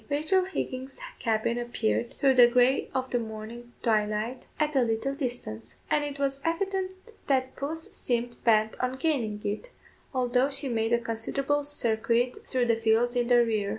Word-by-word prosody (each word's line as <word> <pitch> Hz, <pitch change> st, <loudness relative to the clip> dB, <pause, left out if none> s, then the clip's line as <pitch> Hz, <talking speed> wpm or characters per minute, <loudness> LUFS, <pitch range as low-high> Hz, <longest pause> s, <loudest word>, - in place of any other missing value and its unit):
Rachel 310 Hz, +6 st, +2 dB
Higgins's 265 Hz, -8 st, -4 dB, 0.2 s
cabin 230 Hz, +1 st, 0 dB
appeared, 240 Hz, -1 st, -1 dB
through 270 Hz, -1 st, +4 dB
the 245 Hz, -2 st, +8 dB
grey 250 Hz, +2 st, +3 dB
of 260 Hz, 0 st, -2 dB
the 245 Hz, -, +2 dB
morning 230 Hz, +2 st, -8 dB
twilight, 215 Hz, +2 st, 0 dB, 0.2 s
at 305 Hz, -1 st, +1 dB
a 265 Hz, -, +5 dB
little 235 Hz, +3 st, 0 dB
distance; 240 Hz, -, -5 dB, 0.2 s
and 295 Hz, -, +3 dB
it 290 Hz, -1 st, -4 dB
was 275 Hz, -1 st, -1 dB
evident 375 Hz, +4 st, -2 dB, 0.2 s
that 260 Hz, -2 st, +1 dB
puss 320 Hz, +3 st, -4 dB
seemed 240 Hz, -1 st, -2 dB
bent 220 Hz, -1 st, +3 dB
on 255 Hz, 0 st, -1 dB
gaining 245 Hz, -9 st, -1 dB
it, 210 Hz, -, -3 dB, 0.4 s
although 255 Hz, 0 st, +2 dB
she 275 Hz, 0 st, +1 dB
made 225 Hz, -1 st, 0 dB
a 235 Hz, -, +5 dB
considerable 235 Hz, +5 st, -1 dB
circuit 235 Hz, -3 st, 0 dB
through 255 Hz, -2 st, +1 dB
the 230 Hz, -1 st, +3 dB
fields 225 Hz, +2 st, +2 dB
in 240 Hz, -1 st, +1 dB
the 240 Hz, -1 st, +5 dB
rear. 215 Hz, -3 st, 0 dB
245 Hz, 165 wpm, -28 LUFS, 225-275 Hz, 0.4 s, the